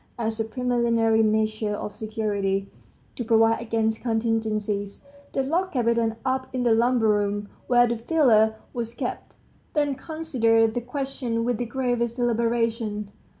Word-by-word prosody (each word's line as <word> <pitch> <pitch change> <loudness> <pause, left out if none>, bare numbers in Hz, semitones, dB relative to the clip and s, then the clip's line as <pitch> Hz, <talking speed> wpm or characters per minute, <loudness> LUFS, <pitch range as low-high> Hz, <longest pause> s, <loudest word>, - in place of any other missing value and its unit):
As 225 -1 -2
a 225 - 0
preliminary 230 -1 +2
measure 215 -1 +1
of 205 - -5
security, 205 -3 -2 0.4
to 245 - -3
provide 225 0 +3
against 220 -1 -1
contingencies, 220 -3 -1 0.3
they 270 - 0
locked 350 +7 -1
Kapiton 230 -2 +1
up 260 0 0
in 255 -1 -1
the 235 -2 +4
lumber 235 0 +3
room 205 -1 0 0.2
where 245 -1 +5
the 235 0 -1
filter 230 -6 +3 0.2
was 235 -1 -4
kept; 245 -1 -5 0.4
then 290 -2 +2
considered 240 -8 +1
the 245 - -2
question 250 -2 -3
with 245 -2 0
the 245 - -1
gravest 240 -2 -1
deliberation. 230 -3 0
230 Hz, 140 wpm, -25 LUFS, 220-245 Hz, 0.4 s, where